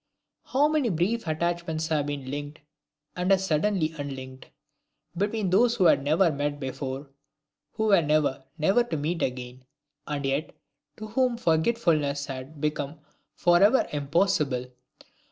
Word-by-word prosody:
How 285 Hz, +3 st, +3 dB
many 300 Hz, -5 st, +1 dB
brief 190 Hz, +5 st, 0 dB
attachments 160 Hz, 0 st, -1 dB
have 150 Hz, -2 st, 0 dB
been 140 Hz, -2 st, -5 dB
linked 145 Hz, +1 st, -5 dB, 0.6 s
and 180 Hz, +2 st, 0 dB
as 190 Hz, 0 st, +3 dB
suddenly 160 Hz, -1 st, +1 dB
unlinked, 130 Hz, -2 st, -7 dB, 0.7 s
between 205 Hz, +1 st, -1 dB
those 235 Hz, +5 st, +4 dB
who 205 Hz, -, +1 dB
had 140 Hz, -, +5 dB
never 155 Hz, +5 st, +3 dB
met 145 Hz, 0 st, -2 dB
before, 135 Hz, +1 st, -5 dB, 0.6 s
who 220 Hz, -, -2 dB
were 195 Hz, -4 st, +6 dB
never, 150 Hz, -3 st, +1 dB
never 195 Hz, +10 st, +3 dB
to 235 Hz, -10 st, -4 dB
meet 160 Hz, +4 st, -2 dB
again 125 Hz, 0 st, -4 dB, 0.4 s
and 145 Hz, -2 st, -3 dB
yet, 135 Hz, +3 st, -2 dB, 0.4 s
to 215 Hz, -, -7 dB
whom 250 Hz, +1 st, +1 dB
forgetfulness 160 Hz, -, +1 dB
had 135 Hz, +2 st, -8 dB
become 150 Hz, 0 st, -2 dB, 0.4 s
forever 195 Hz, +8 st, +4 dB
impossible! 145 Hz, -3 st, +1 dB
155 Hz, 135 wpm, -26 LUFS, 140-195 Hz, 0.7 s, were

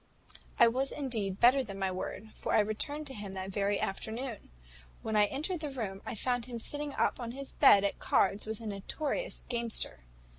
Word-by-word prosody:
"I 235 Hz, -, +9 dB
was 260 Hz, +4 st, +1 dB
indeed 220 Hz, -9 st, -2 dB
better 255 Hz, +3 st, +6 dB
than 200 Hz, -5 st, -7 dB
my 190 Hz, -1 st, 0 dB
word; 195 Hz, +3 st, -5 dB
for -, -, -1 dB
I -, -, +6 dB
returned 220 Hz, +9 st, -1 dB
to 270 Hz, -, -7 dB
him 205 Hz, -4 st, -6 dB
that 190 Hz, 0 st, -5 dB
very 200 Hz, +1 st, +1 dB
afternoon. 225 Hz, +4 st, -4 dB, 0.5 s
When 220 Hz, -, -2 dB
I 210 Hz, -1 st, +6 dB
entered 310 Hz, -, -2 dB
the 305 Hz, -2 st, -3 dB
room, 210 Hz, -8 st, -4 dB
I -, -, -3 dB
found 245 Hz, +2 st, 0 dB
him 240 Hz, -2 st, -6 dB
sitting 290 Hz, +4 st, -3 dB
up -, -, +1 dB
in 235 Hz, -1 st, -4 dB
his 275 Hz, +1 st, -7 dB
bed 205 Hz, -8 st, +7 dB
at 200 Hz, -, -1 dB
cards 200 Hz, +2 st, +2 dB
with 220 Hz, -1 st, -3 dB
a -, -, -8 dB
notorious 275 Hz, -, -3 dB
gamester. 235 Hz, -, 0 dB
230 Hz, 195 wpm, -32 LUFS, 200-270 Hz, 0.5 s, I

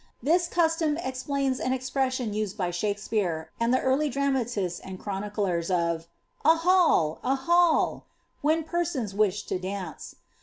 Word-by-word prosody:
This 340 Hz, +5 st, +3 dB
custom 325 Hz, -3 st, +1 dB
explains 265 Hz, -2 st, -2 dB
an 255 Hz, -, 0 dB
expression 260 Hz, -3 st, -1 dB
used 210 Hz, -1 st, -3 dB
by 180 Hz, -3 st, -1 dB
Shakspeare, 200 Hz, -3 st, -2 dB
and 230 Hz, +1 st, +2 dB
the 255 Hz, -, +4 dB
early 270 Hz, +3 st, +2 dB
dramatists 240 Hz, -9 st, -1 dB
and 190 Hz, -1 st, -8 dB
chroniclers, 195 Hz, -4 st, -2 dB
of 170 Hz, -2 st, 0 dB, 0.4 s
^A 320 Hz, +2 st, +6 dB
hall! 330 Hz, -, +3 dB
a 265 Hz, +2 st, +2 dB
hall!'' 340 Hz, +4 st, +2 dB, 0.3 s
when 315 Hz, +2 st, +2 dB
persons 320 Hz, -, -2 dB
wished 205 Hz, 0 st, +1 dB
to 185 Hz, -, -1 dB
dance. 185 Hz, -2 st, -6 dB
250 Hz, 140 wpm, -27 LUFS, 195-295 Hz, 0.4 s, ^A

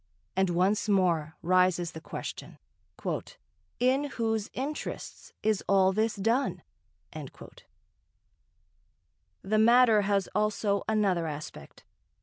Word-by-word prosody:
And 190 Hz, 0 st, +2 dB
once 190 Hz, +5 st, +1 dB
more 170 Hz, -5 st, +1 dB
rises 180 Hz, -1 st, +2 dB
the 160 Hz, -, -9 dB
question: -, -, -7 dB, 1.2 s
"In 260 Hz, +3 st, +2 dB
whose 225 Hz, -6 st, -2 dB
interests 285 Hz, +4 st, -5 dB
is 215 Hz, -2 st, +1 dB
all 190 Hz, -1 st, +4 dB
this 220 Hz, +2 st, 0 dB
done?" 230 Hz, +7 st, 0 dB, 0.5 s
The -, -, -11 dB, 2.0 s
matter 230 Hz, -1 st, +6 dB
has 200 Hz, -1 st, +1 dB
also 210 Hz, -1 st, 0 dB
another 195 Hz, -6 st, +1 dB
aspect. 150 Hz, 0 st, -8 dB
200 Hz, 95 wpm, -29 LUFS, 185-225 Hz, 2.0 s, matter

